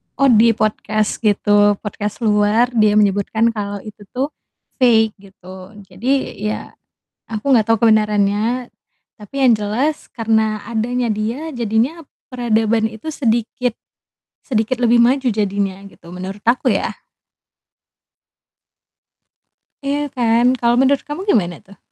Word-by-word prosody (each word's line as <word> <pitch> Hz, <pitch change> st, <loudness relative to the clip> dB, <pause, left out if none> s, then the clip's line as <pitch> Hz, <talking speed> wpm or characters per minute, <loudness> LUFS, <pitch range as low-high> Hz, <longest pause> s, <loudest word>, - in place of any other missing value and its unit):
oh, 275 Hz, -1 st, +4 dB
di 230 Hz, 0 st, +5 dB
podcast 215 Hz, 0 st, -1 dB
gitu, 205 Hz, -1 st, +3 dB
podcast 210 Hz, +2 st, -5 dB
luar, 210 Hz, +3 st, +2 dB
dia 215 Hz, -3 st, +3 dB
menyebutkan 210 Hz, +2 st, +2 dB
kalau 205 Hz, -2 st, -5 dB
itu 215 Hz, -1 st, -11 dB, 0.2 s
tuh 275 Hz, +4 st, -1 dB, 0.5 s
fake, 225 Hz, -4 st, +4 dB
gitu. 190 Hz, 0 st, -13 dB
Jadi 235 Hz, +9 st, -2 dB
ya 215 Hz, -, -5 dB, 0.6 s
aku 220 Hz, +4 st, -4 dB
nggak 225 Hz, -, +4 dB
tahu 225 Hz, +1 st, +3 dB
kebenarannya, 215 Hz, +3 st, +1 dB, 0.5 s
tapi 210 Hz, +3 st, -14 dB
yang 235 Hz, -, +6 dB
jelas 225 Hz, +9 st, -2 dB
karena 220 Hz, -2 st, 0 dB
adanya 235 Hz, +2 st, -1 dB
dia 225 Hz, +8 st, -3 dB
jadinya 240 Hz, +8 st, -1 dB, 0.2 s
peradaban 225 Hz, -2 st, 0 dB
itu 220 Hz, +7 st, -11 dB
sedikit 240 Hz, -1 st, -1 dB, 0.8 s
sedikit 230 Hz, 0 st, -1 dB
lebih 240 Hz, -1 st, +4 dB
maju 260 Hz, +3 st, +2 dB
jadinya, 200 Hz, -3 st, -1 dB
gitu, -, -, -20 dB
menurut 190 Hz, +3 st, -7 dB
aku 235 Hz, +2 st, +2 dB
ya. -, -, -1 dB, 2.9 s
Iya 290 Hz, +1 st, -1 dB
kan? 235 Hz, -1 st, +2 dB
Kalau 235 Hz, -1 st, +2 dB
menurut 270 Hz, +2 st, +3 dB
kamu 295 Hz, +4 st, -6 dB
gimana 175 Hz, -, +2 dB
tuh? 200 Hz, +1 st, -17 dB
220 Hz, 120 wpm, -18 LUFS, 210-245 Hz, 2.9 s, yang